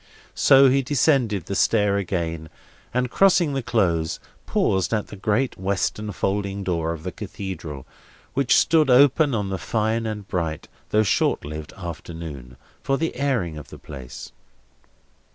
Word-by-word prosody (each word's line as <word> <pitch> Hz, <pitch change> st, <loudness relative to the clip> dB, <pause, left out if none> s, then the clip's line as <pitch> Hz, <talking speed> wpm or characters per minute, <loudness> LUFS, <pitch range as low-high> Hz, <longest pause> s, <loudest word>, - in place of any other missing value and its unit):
So 135 Hz, 0 st, +6 dB
he 135 Hz, +1 st, +3 dB
descended 125 Hz, -, +1 dB
the 100 Hz, -, -4 dB
stair 105 Hz, 0 st, +2 dB
again, 85 Hz, -4 st, -3 dB, 0.4 s
and, 125 Hz, 0 st, -1 dB
crossing 180 Hz, -6 st, +4 dB
the 135 Hz, -, -1 dB
Close, 85 Hz, -9 st, 0 dB, 0.3 s
paused 95 Hz, +4 st, +1 dB
at 105 Hz, -, -3 dB
the -, -, -8 dB
great 105 Hz, +5 st, -1 dB
western 100 Hz, +2 st, -1 dB
folding 100 Hz, +1 st, -2 dB
door 85 Hz, -3 st, -1 dB
of 80 Hz, -2 st, -6 dB
the 90 Hz, -, -4 dB
Cathedral, 90 Hz, -9 st, -7 dB, 0.5 s
which 135 Hz, -2 st, +3 dB
stood 155 Hz, -3 st, +4 dB
open 140 Hz, +2 st, +5 dB
on 105 Hz, -3 st, -2 dB
the 95 Hz, -2 st, -3 dB
fine 110 Hz, +2 st, -1 dB
and 105 Hz, -2 st, -5 dB
bright, 80 Hz, -4 st, -3 dB, 0.2 s
though 110 Hz, 0 st, +3 dB
short 100 Hz, -, +1 dB
lived, 75 Hz, 0 st, -7 dB
afternoon, 80 Hz, -7 st, -8 dB, 0.2 s
for 135 Hz, -, 0 dB
the 165 Hz, +2 st, -2 dB
airing 115 Hz, -, -1 dB
of 75 Hz, -, -12 dB
the -, -, -10 dB
place. 65 Hz, -2 st, -10 dB
100 Hz, 150 wpm, -23 LUFS, 85-125 Hz, 0.5 s, So